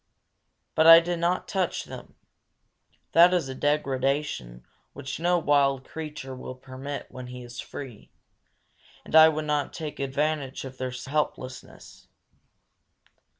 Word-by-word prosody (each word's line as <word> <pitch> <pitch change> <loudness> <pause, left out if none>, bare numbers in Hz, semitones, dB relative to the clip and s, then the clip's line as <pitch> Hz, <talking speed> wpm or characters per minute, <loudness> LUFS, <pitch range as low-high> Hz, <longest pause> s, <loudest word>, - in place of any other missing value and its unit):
But 160 +1 +4
I 165 0 +12
did 170 0 -3
not 175 +2 0
touch 190 -4 -1
them. - - -11 1.0
That 175 +2 +6
is 170 -6 0
a 130 - -5
degradation 135 - -1 0.3
which 135 0 -6
no 175 +1 +2
wild 140 -4 +2
creature 150 -4 -7
will 130 0 -8
permit 135 +2 -7
when 130 -1 -8
he 125 0 -8
is 120 0 -10
free; 130 -7 -9 1.0
and - - -4
I 160 0 +10
would 155 0 -3
not 150 -2 -1
take 155 -3 -6
advantage 140 0 -2
of 130 0 -10
their 130 0 -2
helplessness. 130 0 -5
140 Hz, 130 wpm, -26 LUFS, 130-160 Hz, 1.0 s, I